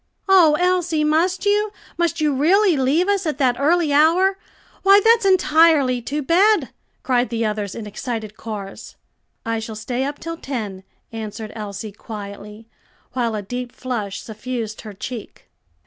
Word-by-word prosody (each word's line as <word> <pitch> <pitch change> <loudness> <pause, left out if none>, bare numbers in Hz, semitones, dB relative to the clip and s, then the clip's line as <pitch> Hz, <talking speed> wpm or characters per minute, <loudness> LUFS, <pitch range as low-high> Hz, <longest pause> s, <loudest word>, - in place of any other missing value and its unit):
"Oh, 345 -6 +6
Elsie, 355 -3 +1
must 335 +6 +1
you? 415 +1 +2 0.2
must 340 -1 0
you 300 -2 +2
really 355 +7 +3
leave 285 +7 +2
us 400 -3 +1
at 300 - -2
that 255 -4 +1
early 315 +1 +2
hour? 360 +6 +4 0.4
Why, 395 +1 +7
that's 450 0 +4
entirely 315 -8 +4
too 290 +5 -3
bad!" 395 +8 +3 0.3
cried 245 -3 +1
the 230 -1 -1
others 210 -2 -3
in 230 - -6
excited 215 0 -5
chorus. 205 -4 -8 0.5
"I 230 0 -1
shall 220 0 -6
stay 245 +4 -3
up 285 +1 -3
till 330 0 -6
ten," 215 - -5 0.3
answered 220 -1 -6
Elsie 210 0 -6
quietly, 210 +1 -9 0.5
while 235 -3 -1
a 210 - -4
deep 245 +4 -5
flush 225 -7 -4
suffused 220 0 -5
her 215 -2 -9
cheek. 225 +3 -8
260 Hz, 150 wpm, -21 LUFS, 220-335 Hz, 0.5 s, Why